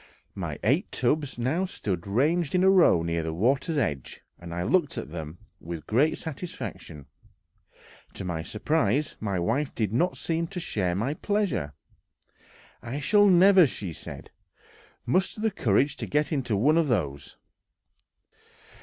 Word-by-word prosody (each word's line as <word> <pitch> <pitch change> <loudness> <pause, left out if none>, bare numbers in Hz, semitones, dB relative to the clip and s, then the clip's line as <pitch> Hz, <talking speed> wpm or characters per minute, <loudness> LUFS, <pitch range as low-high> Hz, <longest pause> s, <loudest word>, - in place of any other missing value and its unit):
My - - -5
eight 140 - +1
tubs 140 +1 0
now 140 +10 0
stood 100 - -4
ranged 150 - +1
in 180 - +3
a 190 - +6
row 175 - +5
near 85 0 -1
the 80 0 -4
water's 140 - +1
edge, 70 - -2 0.2
and 85 -1 -9
I 85 +1 -3
looked 150 - +1
at 70 - -5
them 80 0 -7 0.2
with 85 -1 -7
great 135 +8 +2
satisfaction; 150 - -7 1.1
to 95 - -6
my 85 -3 -3
surprise, 135 - 0
my 100 -3 -2
wife 120 +11 -1
did 110 -3 -1
not 175 +10 +1
seem 165 0 -2
to 180 +1 -6
share 95 - -1
my 115 +9 -1
pleasure! 185 - -1 1.1
"I 125 +5 -5
shall 205 +8 +4
never," 185 -1 +7
said 95 - -7
she, - - -42 0.4
"muster 190 - +1
courage 130 - +1
to - - -5
get 150 +2 0
into 125 -8 0
one 150 +10 +4
of 165 - +1
those!" 75 - -2
130 Hz, 145 wpm, -26 LUFS, -, 1.1 s, never